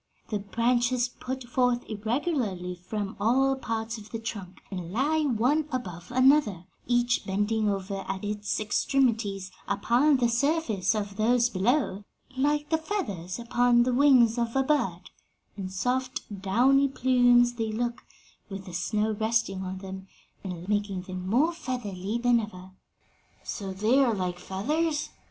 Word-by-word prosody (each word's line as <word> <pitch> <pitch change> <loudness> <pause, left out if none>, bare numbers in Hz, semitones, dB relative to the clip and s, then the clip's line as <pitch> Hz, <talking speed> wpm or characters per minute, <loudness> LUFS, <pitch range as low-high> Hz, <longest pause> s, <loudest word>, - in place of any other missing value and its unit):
'The 210 -2 -1
branches 240 +4 +1
put 260 +1 -6
forth 245 0 0
irregularly 215 - -2
from 195 +3 -5
all 265 +6 +3
parts 225 -3 -4
of 210 0 -13
the 225 - -4
trunk, 195 -5 -7
and 180 -3 -5
lie 290 +9 +1
one 285 +3 +1
above 180 -8 -5
another, 255 - +3 0.2
each 240 0 +2
bending 210 +2 0
over 195 0 -3
at 190 +1 -4
its 210 0 -2
extremities 215 -4 0 0.2
upon 270 +5 +3
the 245 -2 +2
surface 235 - +1
of 205 -1 -4
those 240 +2 +3
below, 205 0 +1 0.3
like 295 +2 +1
the 320 - +3
feathers 200 - -4
upon 240 0 +3
the 250 +1 0
wings 250 -4 +5
of 235 0 -1
a 270 - +3
bird,' 245 - -1 0.4
And 190 -2 -5
soft, 250 +6 -1 0.2
downy 255 +8 +4
plumes 245 -2 +4
they 225 -2 -2
look, 235 +2 -3 0.5
with 195 -1 -7
the 180 - -9
snow 210 +5 0
resting 220 -3 0
on 190 0 -5
them 190 0 -8 0.4
and 180 -2 -6
making 205 -3 -1
them 185 0 -6
more 290 - +3
feathery 230 - -4
than 240 0 +3
ever." 190 -4 -8 0.7
"So 195 -3 -5
they 215 +8 +2
are 235 -4 +2
like 180 -2 -3
feathers?" 295 - -1
230 Hz, 145 wpm, -27 LUFS, 195-255 Hz, 0.7 s, wings